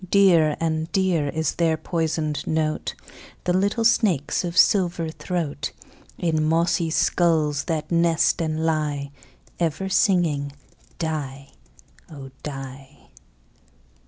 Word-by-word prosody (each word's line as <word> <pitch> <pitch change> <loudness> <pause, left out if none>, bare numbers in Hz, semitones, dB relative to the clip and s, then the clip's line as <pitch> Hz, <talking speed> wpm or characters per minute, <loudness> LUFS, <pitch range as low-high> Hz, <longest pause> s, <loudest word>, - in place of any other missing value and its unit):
Dear 170 -7 +4
and 160 0 -1
dear 180 -7 +1
is 160 0 -1
their 165 -2 +2
poisoned 160 -3 -2
note, 155 -1 -1 0.5
The 180 - +1
little 200 +5 +1
snakes' 195 - +2
of 170 -1 -4
silver 175 -3 +3
throat, 165 -3 -4 0.4
In 160 -3 0
mossy 165 +1 +1
skulls 155 -3 +1
that 155 -2 -3
nest 170 0 +2
and 160 0 -1
lie, 150 -3 -1 0.5
Ever 175 +3 -1
singing 160 -8 +2 0.4
"die, 140 -4 -4 0.6
oh! 135 -3 -10
die." 135 - -9
160 Hz, 105 wpm, -23 LUFS, 150-175 Hz, 0.6 s, Dear